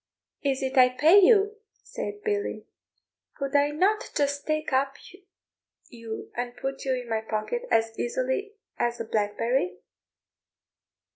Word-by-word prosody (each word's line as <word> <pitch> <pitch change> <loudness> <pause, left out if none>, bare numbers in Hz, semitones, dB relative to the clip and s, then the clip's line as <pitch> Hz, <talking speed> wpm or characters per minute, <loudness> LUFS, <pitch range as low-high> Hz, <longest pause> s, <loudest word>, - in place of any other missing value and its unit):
"Is 275 -1 0
it 265 0 +2
I 250 0 +8
pay 315 +10 +6
you?" 415 +1 +5 0.3
said 415 0 -6
Billy; 415 -1 -2 0.7
"could 275 -1 -3
I 285 0 +4
not 385 +8 +1
just 285 0 0
take 310 -1 -1 1.2
you 230 -2 -7
up - - -21
and 245 0 -4
put 270 0 -4
you 260 -1 +1
in 250 -1 -6
my 225 -1 -1
pocket 220 - -3
as 225 0 +2
easily 260 - -1 0.3
as 240 0 0
a - - -3
blackberry?" 210 -2 0
270 Hz, 135 wpm, -27 LUFS, 235-320 Hz, 1.2 s, I